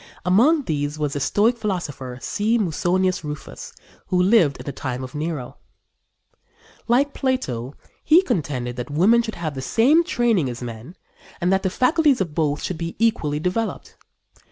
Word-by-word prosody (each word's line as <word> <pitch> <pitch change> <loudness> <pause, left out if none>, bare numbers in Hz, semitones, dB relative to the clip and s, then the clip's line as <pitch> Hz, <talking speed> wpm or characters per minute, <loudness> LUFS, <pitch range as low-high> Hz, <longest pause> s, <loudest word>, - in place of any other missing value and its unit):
Among 260 - +4
these 145 - -2
was 150 -2 -2
the 145 - -2
Stoic 225 - +2
philosopher, 150 - -4
C. 220 +3 0
Musonius 185 -1 0
Rufus, 150 0 -7 0.4
who 180 - +1
lived 180 -6 +4
in - - -10
the 140 - -3
time 130 -2 -5
of 130 - -8
Nero. 150 -4 -4 1.3
Like 270 +4 +2
Plato, 145 - -2 0.3
he 330 +5 +5
contended 140 - -2
that 125 0 -5
women 195 +11 +4
should 225 -2 -5
have 160 -3 -4
the 135 - -5
same 265 - +3
training 230 - +1
as 120 0 -6
men 120 +8 -8 0.4
and 180 +1 +1
that 190 - +2
the 190 - 0
faculties 285 - +2
of 175 -6 -2
both 150 -2 -1
should 180 -4 -4
be 170 0 -4
equally 155 -10 +1
developed. 185 +7 -3
175 Hz, 160 wpm, -22 LUFS, 145-230 Hz, 1.3 s, he